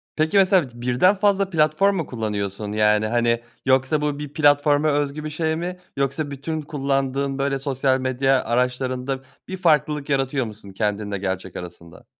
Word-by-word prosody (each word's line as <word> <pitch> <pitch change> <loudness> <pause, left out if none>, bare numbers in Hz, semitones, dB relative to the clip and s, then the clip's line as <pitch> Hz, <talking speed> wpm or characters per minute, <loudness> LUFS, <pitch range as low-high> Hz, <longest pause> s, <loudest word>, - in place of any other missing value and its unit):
Peki, 155 +5 +1
mesela 185 -7 +4
birden 125 +11 +2
fazla 195 -1 +2
platform 165 +4 +2
mu 165 -4 -1
kullanıyorsun? 105 -3 -4
Yani, 105 0 +2
hani, 120 0 +1 0.2
yoksa 130 +3 +2
bu 145 -1 -1
bir 145 -1 -7
platforma 145 0 +3
özgü 145 +1 -1
bir 155 - -4
şey 160 +1 -1
mi? 180 +2 -4 0.2
Yoksa 140 +2 -1
bütün 155 +3 -4
kullandığın, 135 -2 -1
böyle, 135 0 0
sosyal 135 -1 0
medya 130 +1 +1
araçlarında 125 +2 -1 0.3
bir 190 - -5
farklılık 150 -4 +1
yaratıyor 135 -1 0
musun 105 -2 -10
kendinle 105 0 -2
gerçek 95 -1 -4
arasında? 85 -1 -10
135 Hz, 155 wpm, -22 LUFS, 120-155 Hz, 0.3 s, mesela